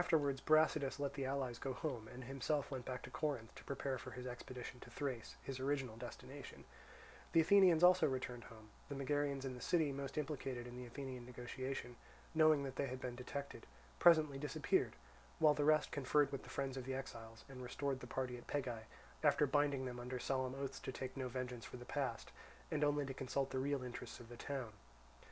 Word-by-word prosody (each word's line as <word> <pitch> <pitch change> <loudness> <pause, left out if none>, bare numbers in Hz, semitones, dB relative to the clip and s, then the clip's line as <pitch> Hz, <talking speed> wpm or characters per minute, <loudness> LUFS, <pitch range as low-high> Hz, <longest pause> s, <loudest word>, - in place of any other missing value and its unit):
Afterwards 145 -6 +2
Brasidas 155 -3 +4
let 140 -1 -1
the 135 -2 -2
allies 130 -3 -1
go 135 - -2
home, 125 -6 -3
and 125 +3 -8
himself 135 +3 -1
went 130 -3 -4
back 125 -1 -4
to 125 - -8
Corinth, 140 -6 -2
to - - -11
prepare 135 -1 -2
for - - -7
his 125 0 -7
expedition 125 0 -6
to - - -11
Thrace, 130 -6 -3
his 135 -1 -4
original 135 -3 0
destination. 125 +3 -8 0.7
The 165 - +8
Athenians 180 -1 +7
also 180 -2 +8
returning 130 -3 -2
home, 110 -1 -13 0.2
the 140 - -3
Megarians 140 0 0
in 130 - -2
the 125 - -8
city 160 -5 +3
most 140 +1 -4
implicated 135 -5 -2
in 125 0 -8
the 125 0 -6
Athenian 130 0 -5
negotiation, 125 0 -4 0.4
knowing 155 -2 +6
that 135 -1 -5
they 140 - +1
had 130 0 -4
been 125 -1 -3
detected, 140 +3 -5 0.3
presently 155 -5 +6
disappeared; 155 - +1 0.4
while 155 -3 +6
the 145 0 +1
rest 155 0 +5
conferred 140 0 +3
with 140 - -3
the - - -12
friends 135 -1 -2
of 130 - -4
the 130 0 -2
exiles, 115 -4 -7
and 130 -2 -8
restored 135 +2 -1
the - - -8
party 125 -2 -2
at - - -15
Pegae, 125 -6 -2 0.4
after 145 0 +5
binding 140 -1 +2
them 125 -1 -4
under 125 +1 -3
solemn 130 0 0
oaths 135 -1 -3
to - - -4
take 130 0 -5
no 130 -2 -2
vengeance 125 -1 -4
for - - -7
the 125 - -9
past, - - -2 0.4
and 150 -1 +2
only 145 -1 +3
to 135 - -4
consult 135 +1 -1
the 130 - 0
real 140 0 0
interests 125 -1 -6
of 115 - -11
the 120 - -8
town. 130 -4 -3
135 Hz, 205 wpm, -39 LUFS, 125-145 Hz, 0.7 s, The